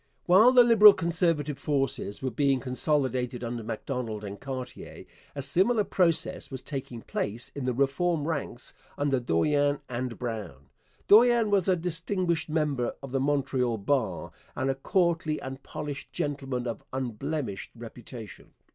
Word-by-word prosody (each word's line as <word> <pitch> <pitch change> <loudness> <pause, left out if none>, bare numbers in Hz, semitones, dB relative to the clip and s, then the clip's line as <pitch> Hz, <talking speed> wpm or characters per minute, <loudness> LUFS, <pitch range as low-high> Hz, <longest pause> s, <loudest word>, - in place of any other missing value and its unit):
While 200 +8 +7
the 250 -1 +8
Liberal 215 -3 +8
Conservative 165 -5 0
forces 135 -7 -1
were 130 - -1
being 135 +2 +2
consolidated 130 -1 -1
under 120 0 -4
Macdonald 115 -1 -4
and 100 0 -7
Cartier, 130 -2 -7 0.3
a 140 - -3
similar 195 - +3
process 175 -4 +1
was 130 -2 -6
taking 130 -5 -6
place 115 +4 -3
in 140 -3 -5
the 125 - 0
Reform 145 +4 +1
ranks 140 -6 -2 0.2
under 140 -2 +1
Dorion 145 - +1
and 125 -1 -4
Brown. 110 - -6 0.4
Dorion 230 0 +6
was 195 -3 +3
a 185 - +4
distinguished 175 0 -1
member 150 -6 0
of 135 - -7
the 135 - 0
Montreal 130 -4 0
bar 125 +4 -1 0.2
and 135 - 0
a - - 0
courtly 165 +2 0
and 135 +1 -7
polished 145 0 -6
gentleman 135 -4 -3
of 115 -3 -4
unblemished 130 -2 -4
reputation. 115 -1 -10
135 Hz, 140 wpm, -28 LUFS, 125-165 Hz, 0.4 s, the